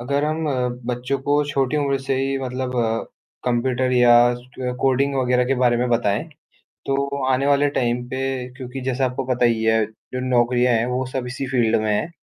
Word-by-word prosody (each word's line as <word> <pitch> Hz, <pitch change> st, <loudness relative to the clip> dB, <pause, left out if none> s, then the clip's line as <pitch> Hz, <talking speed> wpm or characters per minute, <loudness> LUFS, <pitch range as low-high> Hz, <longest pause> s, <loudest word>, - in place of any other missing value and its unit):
अगर 140 Hz, +4 st, 0 dB
हम 155 Hz, +1 st, -1 dB
अ, -, -, 0 dB, 0.3 s
बच्चों 125 Hz, +2 st, -2 dB
को 145 Hz, +1 st, +3 dB
छोटी 140 Hz, 0 st, 0 dB
उम्र 140 Hz, -2 st, +1 dB
से 135 Hz, -, +1 dB
ही 135 Hz, +1 st, 0 dB
मतलब 130 Hz, -1 st, -4 dB
अ, 115 Hz, -1 st, 0 dB, 0.4 s
कंप्यूटर 125 Hz, +1 st, 0 dB
या 125 Hz, -1 st, +5 dB, 0.2 s
स 125 Hz, +1 st, -6 dB
कोडिंग 135 Hz, +1 st, +2 dB
वगैरह 125 Hz, -1 st, +2 dB
के 135 Hz, +2 st, +1 dB
बारे 120 Hz, -1 st, +4 dB
में 125 Hz, +1 st, 0 dB
बताएँ 115 Hz, -3 st, +1 dB, 0.6 s
तो 140 Hz, 0 st, -1 dB
आने 130 Hz, +1 st, +1 dB
वाले 145 Hz, 0 st, +3 dB
टाइम 120 Hz, -3 st, -1 dB
पे 130 Hz, 0 st, -3 dB, 0.4 s
क्योंकि 130 Hz, 0 st, -7 dB
जैसा 130 Hz, +1 st, 0 dB
आपको 130 Hz, +1 st, -2 dB
पता 125 Hz, -1 st, +1 dB
ही 115 Hz, -1 st, +1 dB
है 110 Hz, 0 st, +3 dB, 0.3 s
जो 125 Hz, -, -2 dB
नौकरियाँ 125 Hz, 0 st, +3 dB
है 115 Hz, 0 st, +2 dB
वो 125 Hz, +1 st, -1 dB
सब 130 Hz, 0 st, -4 dB
इसी 130 Hz, +2 st, -4 dB
फील्ड 120 Hz, -3 st, +2 dB
में 110 Hz, 0 st, 0 dB
है। 105 Hz, -, 0 dB
125 Hz, 195 wpm, -22 LUFS, 120-135 Hz, 0.6 s, या